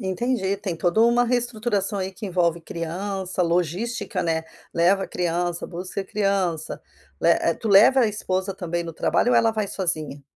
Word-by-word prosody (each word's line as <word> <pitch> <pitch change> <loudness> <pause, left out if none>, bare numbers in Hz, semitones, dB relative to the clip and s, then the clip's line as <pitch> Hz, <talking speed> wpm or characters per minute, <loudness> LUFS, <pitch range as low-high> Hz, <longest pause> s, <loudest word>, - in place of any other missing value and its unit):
Entendi, 195 +1 -1
tem 195 -4 -4
toda 175 +5 +1
uma 240 +1 +4
reestruturação 235 -4 -1
aí, 190 0 -3
que 200 +4 -9
envolve 170 -2 +1
criança, 185 +3 -3
logística, 180 +6 -1
né, 160 -1 -1 0.3
leva 190 +3 +2
criança, 175 0 -2
busca 185 +2 -5
criança, 195 -5 -1 0.4
le - - +3
eh, 170 - +2
tu 225 - -5
leva 215 +7 +7
a 240 - +4
esposa 190 -2 -2
também 175 -2 -3
no 165 - -6
trabalho 240 - +1
ou - - +5
ela 230 -1 +4
vai 215 -2 -2
sozinha? 155 -7 -2
190 Hz, 160 wpm, -24 LUFS, 175-215 Hz, 0.4 s, leva